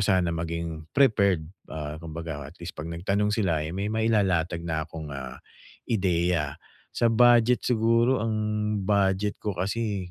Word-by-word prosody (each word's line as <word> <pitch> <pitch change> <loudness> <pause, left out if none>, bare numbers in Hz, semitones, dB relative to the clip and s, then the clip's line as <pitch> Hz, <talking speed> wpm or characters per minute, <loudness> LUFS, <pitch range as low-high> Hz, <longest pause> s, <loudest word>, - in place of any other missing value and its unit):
sana 95 -3 +3
maging 85 -1 -4
prepared, 100 - +3 0.3
ah, 75 -1 -4
kumbaga 80 -3 -6
atleast 85 -1 -9
kapag 80 +2 -6
nagtanong 100 +3 +1
sila, 85 -9 +1
eh, 80 - -4
may 100 +1 -2
mailalatag 95 -7 +1
na 80 -2 -1
akong, 80 -2 -8
ah, 65 -2 -7 0.5
ideya. 90 - +1 0.4
Sa 120 - +2
budget 120 0 +5
siguro, 115 +1 +3
ang 110 -1 0 0.5
budget 100 0 +1
ko 105 -2 -3
kasi 100 -1 -2
95 Hz, 135 wpm, -26 LUFS, 80-110 Hz, 0.5 s, budget